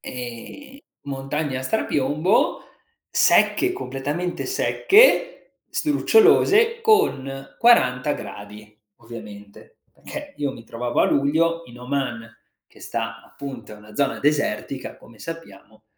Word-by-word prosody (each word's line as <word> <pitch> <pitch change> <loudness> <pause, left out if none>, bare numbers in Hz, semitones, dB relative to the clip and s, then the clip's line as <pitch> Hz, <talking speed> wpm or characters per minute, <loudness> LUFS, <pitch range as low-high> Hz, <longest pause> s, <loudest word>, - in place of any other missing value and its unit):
Ehm, 125 - -9 0.2
montagne 135 0 -3
a - - -5
strapiombo 150 -1 +1 0.5
secche, 365 0 +3
completamente 145 - -4
secche, 405 +3 +3
sdrucciolose 440 +7 +3
con 135 - +1
40 140 - +4
gradi 105 -2 -9 0.2
ovviamente, 105 - -12
perché 295 -1 -9
io 145 -2 -2
mi 115 -3 -12
trovavo 120 +1 -2
a - - +5
luglio 165 +4 +1
in 120 0 -13
Oman, 125 -3 -4 0.4
che - - -21
sta 115 -1 -5
appunto 135 -6 -9
è - - -10
una 105 0 -15
zona 140 +1 0
desertica 145 -2 -1
come 115 -1 -18
sappiamo 110 -9 -10
135 Hz, 110 wpm, -22 LUFS, 115-175 Hz, 0.5 s, a